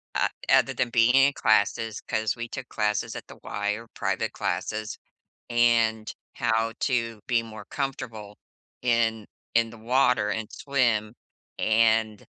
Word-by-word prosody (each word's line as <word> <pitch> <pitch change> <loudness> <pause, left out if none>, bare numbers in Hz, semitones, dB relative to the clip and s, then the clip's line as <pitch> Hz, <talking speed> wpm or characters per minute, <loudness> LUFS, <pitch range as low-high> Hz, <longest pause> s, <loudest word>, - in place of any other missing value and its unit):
O - - +3 0.2
other - - +4
than 120 - 0
being 115 +2 +4
in 135 +1 +5
classes, 110 -1 +1
'cause 110 -1 -1
we 115 0 -5
took 130 +1 -7
classes 105 +1 -1
at - - -8
the - - -12
Y 105 0 -2
or 115 +2 -6
private - - -2
classes 110 -1 -3 0.5
and 115 -2 +2 0.2
how 115 +1 +1
to 115 -4 -1
be 120 -2 +2
more 110 -1 -10
comfortable 115 -7 -5 0.5
in 115 -3 +1 0.3
in 115 -1 +3
the 115 - -12
water 125 -2 +2
and 110 -1 -3
swim. 120 -6 0 0.4
And 110 -1 +2
115 Hz, 140 wpm, -26 LUFS, 110-120 Hz, 0.5 s, in